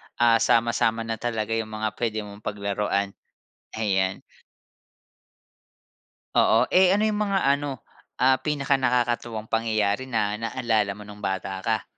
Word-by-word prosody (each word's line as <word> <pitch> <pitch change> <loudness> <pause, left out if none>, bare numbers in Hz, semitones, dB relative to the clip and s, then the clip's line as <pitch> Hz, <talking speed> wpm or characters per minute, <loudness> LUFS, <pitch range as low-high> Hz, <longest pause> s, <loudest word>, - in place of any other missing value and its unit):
ah, 115 -1 +4
sama-sama 115 -1 +2
na 115 -1 -4
talaga 115 -2 -2
yung 115 -1 -1
mga 110 0 -1
puwede 110 -3 -1
mong 100 0 -10
paglaruan. 100 -1 -2 0.6
Ayan. 95 -3 0 2.1
Oo, - - +5
eh, 185 +1 +5
ano 210 - +1
yung 215 -1 +1
mga 195 -1 +1
ano, 140 -3 0 0.3
ah, 130 +1 +3
pinakanakakatuwang 125 -6 0
pangyayari 110 +1 0
na 105 -4 -1
naalala 115 -3 0
mo 105 - -10
nung 105 0 -12
bata 95 -1 -3
ka? - - -1
115 Hz, 125 wpm, -25 LUFS, 105-125 Hz, 2.1 s, Oo